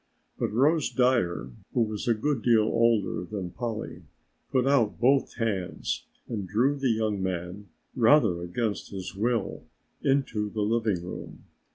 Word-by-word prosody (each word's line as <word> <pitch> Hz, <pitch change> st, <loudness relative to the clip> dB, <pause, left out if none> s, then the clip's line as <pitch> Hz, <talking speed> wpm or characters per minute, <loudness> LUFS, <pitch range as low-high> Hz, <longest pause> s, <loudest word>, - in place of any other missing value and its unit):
But -, -, 0 dB
Rose 145 Hz, +7 st, +3 dB
Dyer, 115 Hz, -, +1 dB, 0.2 s
who 120 Hz, -, +3 dB
was 110 Hz, -1 st, -2 dB
a 115 Hz, -, +4 dB
good 130 Hz, +3 st, -1 dB
deal 115 Hz, -2 st, +4 dB
older 115 Hz, -3 st, +2 dB
than 90 Hz, -1 st, -5 dB
Polly, 115 Hz, 0 st, -5 dB, 0.5 s
put 130 Hz, -1 st, +2 dB
out 135 Hz, -8 st, +2 dB
both 135 Hz, +4 st, +3 dB
hands 105 Hz, -6 st, -2 dB, 0.2 s
and 105 Hz, -5 st, -4 dB
drew 125 Hz, +9 st, +2 dB
the 135 Hz, -2 st, 0 dB
young 110 Hz, -3 st, 0 dB
man, 95 Hz, +2 st, -4 dB, 0.3 s
rather 115 Hz, -, +4 dB
against 100 Hz, +5 st, -2 dB
his 95 Hz, -2 st, -6 dB
will, 115 Hz, +1 st, -1 dB, 0.4 s
inside 115 Hz, -7 st, 0 dB
the 105 Hz, -, +1 dB
living 110 Hz, -5 st, 0 dB
room. 90 Hz, -, -8 dB
110 Hz, 145 wpm, -27 LUFS, 100-125 Hz, 0.5 s, a